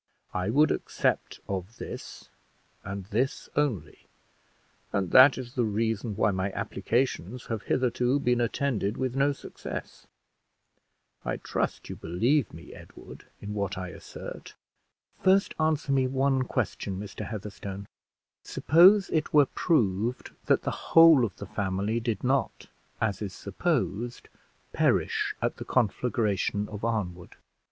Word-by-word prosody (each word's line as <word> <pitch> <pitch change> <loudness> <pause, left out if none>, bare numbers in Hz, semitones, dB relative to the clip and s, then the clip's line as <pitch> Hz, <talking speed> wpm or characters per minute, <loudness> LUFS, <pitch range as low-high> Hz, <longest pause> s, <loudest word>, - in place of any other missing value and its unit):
I 90 +2 -1
would 150 +7 +4
accept - - -1
of 95 +3 -5
this, - - -8 0.5
and 100 -1 -6
this 115 +7 -1
only; 140 - -2 0.8
and 95 -3 -1
that 130 +1 +8
is 125 -1 -7
the 125 -3 +1
reason 110 0 -1
why 105 - +2
my 95 +1 -1
applications 125 -2 -2
have 110 -2 -2
hitherto 125 +2 +1
been 125 -3 +1
attended 115 -4 -1
with 130 -1 -2
no 140 +1 +3
success. 140 - -8 1.2
I - - -2
trust - - -3
you - - -6
believe 115 - +1
me, 80 +1 -11
Edward, - - -13
in 105 +1 -5
what 100 -2 -2
I 90 -1 -4
assert?" - - -9 0.7
"First 190 +1 +4
answer 155 -2 +1
me 135 -1 +3
one 135 0 +1
question, 100 -6 -2
Mr. 105 +1 -6
Heatherstone. 100 -2 -6 0.6
Suppose 185 +5 +5
it 155 -1 0
were 145 -1 +7
proved 120 - 0 0.2
that - - +3
the - - -1 0.2
whole 165 -5 +9
of 110 - -2
the 100 - -8
family 100 +3 -1
did 115 -3 -3
not, 135 +2 0 0.3
as 105 -3 -1
it - - -1
is 95 - -7
supposed, 120 - -2 0.4
perish - - +1
at - - 0
the - - -6
conflagration 105 -3 0
of 105 0 -8
Arnwood? 90 -7 -3
115 Hz, 135 wpm, -28 LUFS, 100-135 Hz, 1.2 s, whole